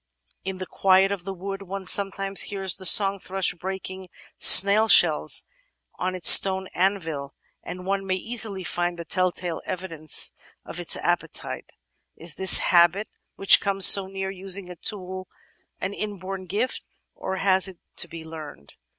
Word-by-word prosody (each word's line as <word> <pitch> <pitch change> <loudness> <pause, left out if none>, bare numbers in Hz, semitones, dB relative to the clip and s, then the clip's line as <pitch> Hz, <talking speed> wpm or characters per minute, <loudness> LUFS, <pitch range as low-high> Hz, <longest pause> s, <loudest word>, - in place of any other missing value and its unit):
"In 190 0 -6
the 185 - -7
quiet 190 +1 +1
of 190 -3 -6
the 195 - -6
wood 195 +2 -8
one 195 0 -8
sometimes. 195 0 +1
hears 195 -3 -2
the 185 -1 0
song 195 +2 +5
thrush 190 +1 -2
breaking 190 +1 -8 0.3
snail 205 +3 +7
shells - - +3 0.5
on 185 +1 -3
its 180 - -1
stone 190 -1 +6
anvil, 165 -7 -3 0.3
and 180 0 -10
one 195 0 -3
may 185 - -1
easily 215 -1 -1
find 175 0 -3
the 170 - -9
telltale 180 0 -3
evidences 165 -4 -2 0.3
of - - -7
its - - 0
appetite. - - -5 0.5
Is 165 -1 -5
this 190 +5 +4
habit, 175 +4 +2 0.3
which 195 - +5
comes 195 -1 0
so 195 -1 +7
near 195 0 -6
using 190 -1 -6
a - - -10
tool, 185 0 -4 0.5
an 200 - -5
inborn 195 -2 -7
gift 215 +8 -4 0.3
or 190 - -6
has 190 0 +2
it 190 -2 -9 0.2
to - - +2
be 165 -1 -11
learned? 155 - -12
190 Hz, 155 wpm, -23 LUFS, 180-195 Hz, 0.5 s, snail